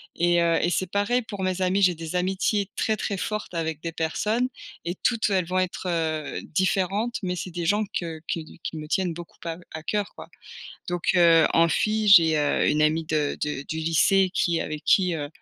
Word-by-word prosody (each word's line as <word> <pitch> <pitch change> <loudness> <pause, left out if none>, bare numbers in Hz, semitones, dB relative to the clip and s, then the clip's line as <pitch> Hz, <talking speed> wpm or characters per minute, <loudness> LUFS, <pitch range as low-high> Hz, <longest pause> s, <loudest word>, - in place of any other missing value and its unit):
Et 175 0 +2
heu, 170 -1 +3
et 175 - +2
c'est 185 +1 -1
pareil 205 +6 +1
pour 205 -4 -6
mes 185 0 -1
amis. 185 +2 +1
J'ai 185 -2 +5
des 165 +1 -6
amitiés 190 +2 0
très, 220 - +1
très 200 -1 -3
fortes 210 0 -4
avec 160 -2 -3
des 165 - -4
personnes 210 +9 -1 0.4
et 175 +1 -2
toutes 230 +2 0
elles 190 -2 +2
vont 185 +2 -1
être, 185 0 -3
heu, 160 -3 -2
différentes. 195 +6 0
Mais 180 -2 -2
c'est 180 +1 -5
des 170 0 -4
gens 205 +5 +2 0.2
que 165 -2 -6
qui 160 -1 -5
qui 160 - -5
me 155 0 -7
tiennent 180 +1 0
beaucoup 170 0 -11
à 165 -1 -4 0.2
à 160 - -6
coeur, 205 +3 -2
quoi. - - -11 0.6
Donc 175 -1 -2
heu, 165 -3 +6
en 165 0 +4
fille 215 +6 +1
j'ai, 165 -6 +7
heu, 145 -1 +1
une 150 - +1
amie 155 +1 +2
de 155 -2 -1
de 150 -2 -2
du 160 - -3
lycée 180 +4 +3
qui 170 -3 +1
avec 150 0 -6
qui, 185 -2 +3
heu, 145 -3 -4
175 Hz, 210 wpm, -25 LUFS, 160-195 Hz, 0.6 s, j'ai